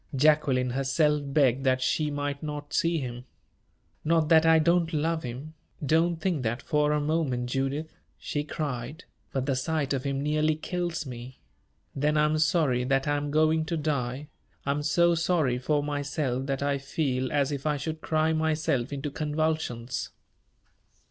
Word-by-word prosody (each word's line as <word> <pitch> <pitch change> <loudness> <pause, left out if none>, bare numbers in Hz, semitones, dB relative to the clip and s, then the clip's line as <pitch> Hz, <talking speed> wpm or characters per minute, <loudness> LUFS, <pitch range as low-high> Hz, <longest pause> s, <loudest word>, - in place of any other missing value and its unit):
Jacqueline 135 -3 +3
herself 145 +3 +2
begged 135 -2 +2
that 130 -1 +3
she 150 +4 +1
might 145 -1 -3
not 150 -1 -6
see 165 0 +2
him. 125 -3 -5 0.8
"Not 160 -1 +2
that 165 -1 +6
I 160 0 +7
don't 170 +1 +2
love 160 +1 0
him 130 +5 -7 0.3
don't 165 +4 +3
think 170 -3 -1
that 120 0 -1
for 150 0 +1
a 150 - +2
moment, 145 -5 -1
Judith!" 135 +4 -2 0.2
she 145 - -3
cried; 145 0 -4 0.3
"but 135 -1 -1
the 135 -2 0
sight 145 +1 -1
of 130 -2 -2
him 140 -1 -1
nearly 155 +1 +2
kills 170 0 -3
me. 125 0 -8 0.6
Then 150 +2 +1
I 150 - +4
am 155 +1 +1
sorry 155 -7 +2
that 135 +2 +1
I 145 - +2
am 145 0 -2
going 155 +1 +3
to 165 +1 -2
die 145 -2 -2 0.4
I 140 - +1
am 145 +1 -1
so 170 +3 +3
sorry 160 -7 +1
for 145 +3 +1
myself 145 -2 -2
that 135 0 -1
I 140 -1 0
feel 135 -2 -1
as 140 -1 +1
if 140 +1 -3
I 150 -1 +1
should 155 +2 -4
cry 155 0 +1
myself 155 -5 0
into 140 +1 -4
convulsions." 150 -5 -2
145 Hz, 170 wpm, -27 LUFS, 135-155 Hz, 0.8 s, I